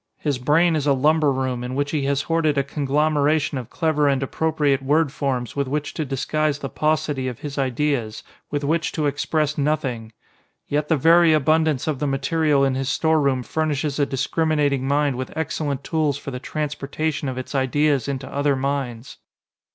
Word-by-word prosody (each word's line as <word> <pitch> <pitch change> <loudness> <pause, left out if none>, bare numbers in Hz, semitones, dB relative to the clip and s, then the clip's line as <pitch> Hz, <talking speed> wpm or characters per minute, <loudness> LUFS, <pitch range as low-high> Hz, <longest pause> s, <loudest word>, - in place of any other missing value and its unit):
His 145 -4 -2
brain 160 +6 +3
is 150 -2 -1
a 140 - +5
lumber 150 +2 +3
room 130 -2 -2
in 125 +1 -4
which 145 +1 -1
he 145 -3 -1
has 140 0 0
hoarded 165 -3 +1
a 140 - +3
conglomeration 150 +1 +1
of 120 -2 -9
clever 155 -3 +1
and 135 -1 +1
appropriate 145 -1 0
word 145 +2 +2
forms 130 -5 -2
with 140 -1 -1
which 150 +2 -3
to 155 - -3
disguise 145 +2 -1
the 140 -1 -5
paucity 150 -3 0
of 125 -3 -6
his 145 -1 -5
ideas, 130 -4 -1 0.3
with 145 0 -2
which 160 +3 0
to 155 - -1
express 150 +1 0
nothing! 130 -6 -1 0.6
Yet 150 +1 -1
the 160 - +2
very 165 +3 +5
abundance 155 -1 +2
of 150 -4 -2
the 150 - -1
material 140 +1 +1
in 135 - +1
his 135 0 -2
storeroom 140 -5 +2
furnishes 150 0 -1
a 140 - +2
discriminating 145 -1 0
mind 140 -2 +1
with 130 +3 -6
excellent 145 -3 -2
tools 155 -4 0
for 140 - -7
the 125 - -5
transportation 150 0 -3
of 130 - -5
its 130 - -6
ideas 140 0 +1
into 135 -1 -4
other 140 +1 0
minds. 135 -3 -3
145 Hz, 180 wpm, -22 LUFS, 135-155 Hz, 0.6 s, a